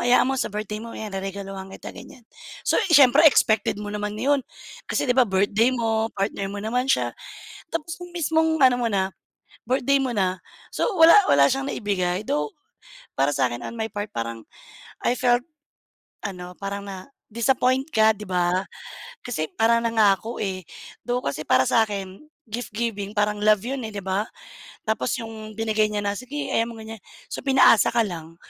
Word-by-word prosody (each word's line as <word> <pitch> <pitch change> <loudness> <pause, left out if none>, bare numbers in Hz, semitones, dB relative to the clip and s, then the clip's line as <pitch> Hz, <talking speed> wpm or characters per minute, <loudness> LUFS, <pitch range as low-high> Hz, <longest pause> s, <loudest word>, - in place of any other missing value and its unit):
hayaan 245 +1 +4
mo 265 - 0
sa - - -1
birthday 210 +1 -4
mo 230 - -8
ayan 215 -2 -6
reregaluhan 195 0 -6
kita." - - -9
Ganiyan. 245 - -13 0.4
So, - - +2
eh, 415 - -2
siyempre 285 -1 +7
expected 220 -5 +2
mo 210 - -6
naman 210 0 -4
'yon, 280 +2 +2 0.5
kasi - - 0
'di 245 - +2
ba 255 - +6
birthday 200 +5 +2
mo, 225 -2 0
partner 195 0 -2
mo 205 - -5
naman 250 +5 -1
siya, - - +1 0.6
tapos 330 0 -3
'yong 355 0 -10
mismong 320 -1 +2
ano 255 -2 +6
mo 240 - 0
na, 190 -1 +1 0.6
birthday 265 +3 +2
mo 260 -2 -1
na, 185 -3 0 0.4
so - - 0
wala 325 +3 +9 0.2
wala 140 0 +6
siyang 270 0 -1
naibigay, 185 -3 -1
though 295 +10 -1 0.7
para 140 +2 +2
sa 130 -2 +2
akin 120 0 -6
on - - -6
my 220 - -1
part 205 0 -5
parang 115 -1 -5 0.6
I 245 - +1
felt 245 0 +2 0.8
ano, 180 -2 -7
parang 200 0 -4
na 190 -2 -8 0.2
disappoint 255 +3 +1
ka 220 0 +5
'di 210 - -8
ba, 180 +1 0 0.6
kasi 155 -11 -3
parang 230 +1 +3
nangako, 220 0 +2
eh, 185 -2 -3 0.4
though 245 0 0
kasi 150 +2 -3
para 130 - +5
sa 225 - +4
akin 195 -2 -6 0.2
gift-giving 220 -2 -4
parang 210 0 +1
love 210 -1 +3
'yon 265 +3 -3
eh, - - -8
'di 200 - -5
ba. 195 +3 -1 0.6
Tapos 220 +4 -1
'yong 220 -3 -8
binigay 220 -1 +1
niya 210 -1 -3
na, 200 - 0
sige 255 +7 -5
hayaan 230 +1 +1
mo 230 - -9
ganiyan, 220 -1 -9 0.3
so - - -4
pinaasa 265 -5 +5
ka 230 - +3
lang, 165 -3 -7
215 Hz, 180 wpm, -24 LUFS, 195-245 Hz, 0.8 s, wala